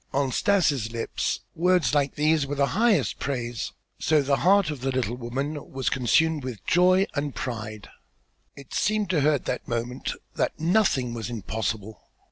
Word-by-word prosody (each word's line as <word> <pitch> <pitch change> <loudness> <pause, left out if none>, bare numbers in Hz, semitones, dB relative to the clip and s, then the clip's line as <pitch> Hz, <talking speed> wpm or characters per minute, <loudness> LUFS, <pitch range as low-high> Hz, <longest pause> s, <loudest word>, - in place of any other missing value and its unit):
On 135 -1 +1
Stas' 150 - +2
lips 115 -1 -2
words 180 -2 +2
like 140 -2 +1
these 150 -1 +2
were 145 - -3
the 140 0 +3
highest 210 - +2
praise; 120 -4 -3 0.3
so 155 -2 +3
the 140 0 +2
heart 195 -2 +4
of 145 -4 -7
the 135 - -1
little 125 -3 -1
woman 135 +5 -4
was 135 0 -1
consumed 150 +4 +2
with 125 -7 -7
joy 185 +2 +4
and 145 -1 -2
pride. 110 -5 -5 0.7
It 140 -2 -12
seemed 210 -3 +1
to 160 -5 +2
her 150 +2 +4
at 145 - -2
that - - -3
moment 120 +2 -3 0.2
that - - -1
nothing 160 - +2
was 115 0 -4
impossible. 110 -1 -4
140 Hz, 165 wpm, -26 LUFS, 120-160 Hz, 0.7 s, heart